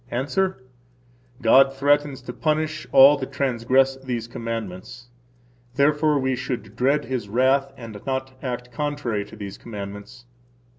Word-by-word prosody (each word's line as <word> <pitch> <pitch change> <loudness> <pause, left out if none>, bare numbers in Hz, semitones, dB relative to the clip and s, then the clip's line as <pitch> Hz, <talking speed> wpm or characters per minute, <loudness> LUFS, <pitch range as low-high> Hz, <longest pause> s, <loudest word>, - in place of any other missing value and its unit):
–Answer: 145 +5 -1 0.8
God 135 +4 +6
threatens 145 -1 +1
to 125 - -7
punish 155 +1 -1
all 140 +2 +8
that 130 0 -5
transgress 135 0 +2
these 125 -4 -4
commandments. 115 0 -6 0.7
Therefore 150 +2 +3
we 130 -1 0
should 120 -5 -5
dread 140 +4 +1
His 125 -6 -4
wrath 135 +4 +2
and 110 -4 -9
not 130 0 -2
act 125 -1 -5
contrary 145 -6 -2
to - - -13
these 100 -2 -8
commandments. 100 +2 -9
130 Hz, 130 wpm, -23 LUFS, 115-140 Hz, 0.8 s, all